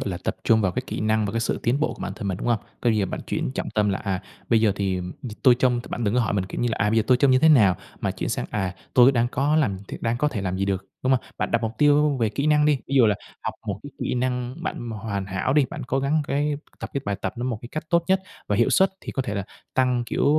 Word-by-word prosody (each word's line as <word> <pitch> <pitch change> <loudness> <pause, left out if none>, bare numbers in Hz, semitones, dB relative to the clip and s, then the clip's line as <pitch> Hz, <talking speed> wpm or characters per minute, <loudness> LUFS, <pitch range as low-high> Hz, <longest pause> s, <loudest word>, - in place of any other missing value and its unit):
gọi - - -2
là, 90 - -3
tập - - -1
trung 110 -1 +4
vào 95 -3 +1
cái 125 - -2
kỹ - - -4
năng 110 0 +1
và 100 - -4
cái 115 - 0
sự 115 - -1
tiến 125 +5 +1
bộ 155 - 0
của - - -15
bản - - -3
thân 100 - -4
mình, 95 - -1
đúng - - -4
hông? 115 - +3 0.2
Coi 120 - +3
như 110 - +1
là 100 - +1
bạn - - -5
chuyển - - -2
trọng - - -3
tâm 105 -1 +1
là, 100 - 0
à, 95 -2 -3 0.3
bây 115 -2 +4
giờ 105 -3 +3
thì 95 -2 0 0.4
tôi 125 -3 +7
trông 125 -1 +2
bạn 120 - -3
đừng 105 +1 +1
có 125 - +4
hỏi 110 - 0
mình, 95 - 0
kiểu - - -5
như 120 - +1
là, - - -1
à, 105 +1 +2
bây 115 - +1
giờ - - +3
tôi 130 - +5
trông 135 +2 +4
như 130 - +5
thế 160 +4 +5
nào, 105 - +6 0.2
mà - - 0
chuyển - - -4
sang, - - -2
à, 95 -3 -2 0.2
tôi 130 +1 +7
đang 120 -1 +2
có 140 +5 +1
làm 110 -12 +1
th - - -6
đang 115 +1 0
có 150 +5 +1
thể 120 -8 -4
làm 95 -1 -2
gì 100 - +1
được, 95 -1 -1 0.2
đúng 130 +1 +2
hông? 130 - +3 0.2
Bạn - - -1
đặt 115 0 +1
mục 110 0 -1
tiêu 145 -1 +4
về 115 -3 +1
kỹ 140 +8 -2
năng 150 0 +4
đi, 150 -2 +3
ví 140 - -3
dụ 120 - +7
là 105 - +3 0.3
học - - -3
một - - -3
cái - - -8
kỹ - - -2
năng 125 0 -1
bạn 120 -6 -4
hoàn 100 -3 -4
hảo 95 +7 -1
đi, 145 0 +4
bạn 155 -4 -6
cố 135 - 0
gắng 145 +3 +1
cái 145 +1 +1 0.3
tập - - -5
cái 140 - 0
bài 100 0 -1
tập - - -1
nó 120 - -3
một 125 -4 -2
cái 120 - -8
cách 155 +5 -5
tốt 170 -1 +3
nhất, 190 0 +3 0.2
và 105 - 0
hiệu 120 - +3
suất 190 0 +4
thì - - -7
có 135 - -1
thể 105 - -4
là 100 - -2 0.3
tăng, 125 -2 +2
kiểu, - - 0
120 Hz, 320 wpm, -24 LUFS, 105-135 Hz, 0.4 s, tôi